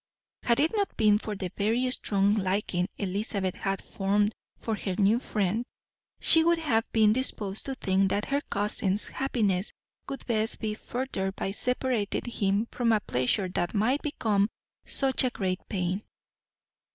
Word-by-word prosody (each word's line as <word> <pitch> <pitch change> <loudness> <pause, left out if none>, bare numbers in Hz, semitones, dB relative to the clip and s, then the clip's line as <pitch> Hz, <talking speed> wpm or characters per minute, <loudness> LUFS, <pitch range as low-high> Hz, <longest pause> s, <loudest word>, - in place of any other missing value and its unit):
Had 235 -1 +2
it 310 +3 +3
not 405 -2 -1
been 210 -2 +4
for 215 -1 -5
the 185 -2 -4
very 230 +5 +1
strong 200 -4 +2
liking 190 -2 0
Elizabeth 195 -1 -2
had 195 -1 -3
formed 205 +2 +1 0.2
for 225 - -2
her 190 -3 -3
new 210 +3 +4
friend, 210 -1 -1 0.6
she 325 - +6
would 340 +1 +4
have 245 -9 0
been 215 -2 +5
disposed 215 -5 0
to 270 - -3
think 195 -4 +1
that 205 +2 0
her 280 +1 0
cousin's 205 -1 0
happiness 210 -8 0 0.4
would 275 - -6
best 220 -2 +1
be 215 -1 -2
furthered 215 -5 -3
by 195 - -2
separating 250 -1 -1
him 205 -3 0
from 235 -2 +1
a 220 - +4
pleasure 130 +5 0
that 175 +2 -2
might 245 +8 +2
become 215 -8 +1 0.4
such 265 -2 +1
great 185 -3 -1
pain. 185 0 -1
210 Hz, 150 wpm, -28 LUFS, 195-240 Hz, 0.6 s, she